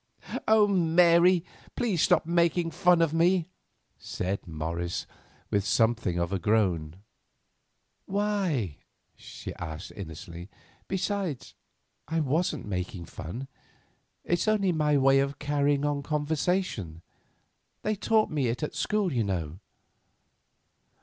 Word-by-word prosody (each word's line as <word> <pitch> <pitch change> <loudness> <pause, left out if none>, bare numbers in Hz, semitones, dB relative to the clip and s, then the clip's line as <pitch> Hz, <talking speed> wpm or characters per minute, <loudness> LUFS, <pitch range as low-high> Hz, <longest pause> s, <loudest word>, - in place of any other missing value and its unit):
"Oh! 215 -1 +6
Mary, 175 -1 +4 0.3
please 205 -9 0
stop 175 -3 +3
making 170 0 +2
fun 175 0 +4
of 160 -2 0
me," 175 +1 +2 0.5
said 95 +1 -4
Morris, 85 +2 -3 0.5
with 100 -1 +2
something 110 -3 +1
like 85 0 -1
a 95 - 0
groan. 90 -7 +1 1.1
"Why?" 190 - -1 0.4
she - - -9
asked 80 0 -6
innocently. 85 -1 -8 0.4
"Besides 190 - -2 0.5
I 165 +2 0
wasn't 160 +5 0
making 90 -1 -4
fun. 115 - -7 0.8
It's 175 +4 0
only 205 -3 +3
my 150 -3 +2
way 135 0 +5
of 140 0 -1
carrying 145 0 +1
on 145 -1 0
conversation; 150 - -1 0.8
they 215 - +1
taught 215 +1 +2
it - - -6
me 135 -5 +1
at 135 +6 -3
school, 210 -5 0
you 120 -3 +1
know." 90 -4 -3
145 Hz, 115 wpm, -28 LUFS, -, 1.1 s, Oh